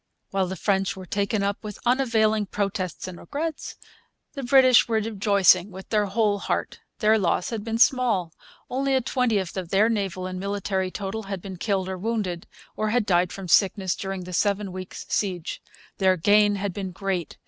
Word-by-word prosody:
While 195 -1 0
the 190 - -4
French 195 -1 0
were 185 - -8
taken 200 +2 -1
up 200 +2 -2
with 210 -2 -7
unavailing 220 -4 +2
protests 195 -3 -3
and 180 -2 -8
regrets 310 - -4 0.6
the 275 - -5
British 255 -1 +6
were 230 - 0
rejoicing 200 -4 +3
with 190 0 -11
their 210 -2 +2
whole 205 0 +1
heart. - - -3 0.2
Their 220 -1 +3
loss 180 +1 0
had 220 -3 -3
been 225 0 -2
small. 230 -9 +3 0.3
Only 270 +1 0
a 260 - +2
twentieth 230 -8 0
of 180 -3 -4
their 205 +4 +3
naval 195 -5 -2
and 185 0 -5
military 195 -1 -2
total 200 +3 -4
had 195 -2 -3
been 190 0 -8
killed 190 -1 -1
or 190 -1 -4
wounded, 200 -5 -2 0.3
or 215 0 -1
had 235 0 +1
died 180 -1 +2
from 195 -2 -7
sickness, 190 +1 +3
during 195 -1 -5
the 180 0 -8
seven 200 +1 0
weeks' 185 0 -7
siege. 180 -5 -2 0.4
Their 190 -1 +3
gain 205 +3 +4
had 200 -1 -3
been 195 -1 -4
great. 185 -2 -3
200 Hz, 180 wpm, -25 LUFS, 185-220 Hz, 0.6 s, British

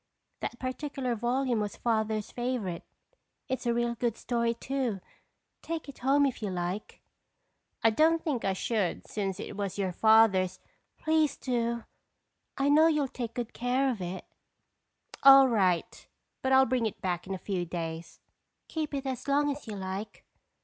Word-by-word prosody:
That 240 - -4
particular 260 0 -3
volume 240 +1 0
was 210 -2 -3
Father's 220 -2 -1
favorite. 240 -8 -3 0.6
It's 260 -2 -3
a 235 - +3
real 240 0 +1
good 235 -1 -1
story 235 -1 0
too. 245 -4 -2 0.6
Take 330 -2 -4
it 280 - -10
home 280 +3 +4
if 265 -4 -2
you 210 - -2
like." 180 +2 -4 0.8
"I 225 - +6
don't 320 +8 +4
think 280 -7 -1
I 195 - +1
should 200 -1 -1
since 195 -2 -3
it - - -6
was 200 -1 -3
your 190 -2 0
father's—" 195 -2 +4 0.4
"Please 315 -3 +1
do. 235 -2 -1 0.7
I 275 - +1
know 305 +3 +6
you'll 300 -4 +2
take 235 -2 -5
good 240 -3 -4
care 255 +3 +1
of 220 -6 -5
it." 180 +1 -5 1.0
"All 275 -1 +9
right, 190 -8 0 0.3
but 265 - 0
I'll 265 0 +7
bring 245 -2 +1
it 215 - -7
back 180 -1 -2
in 195 - -2
a 185 - -12
few 180 -2 0
days." 165 -1 -5 0.5
"Keep 310 -2 -3
it 275 0 -3
as 260 -1 -4
long 290 +1 +2
as 285 -2 -7
you 215 - -5
like." 190 +2 -6
235 Hz, 165 wpm, -29 LUFS, 200-265 Hz, 1.0 s, All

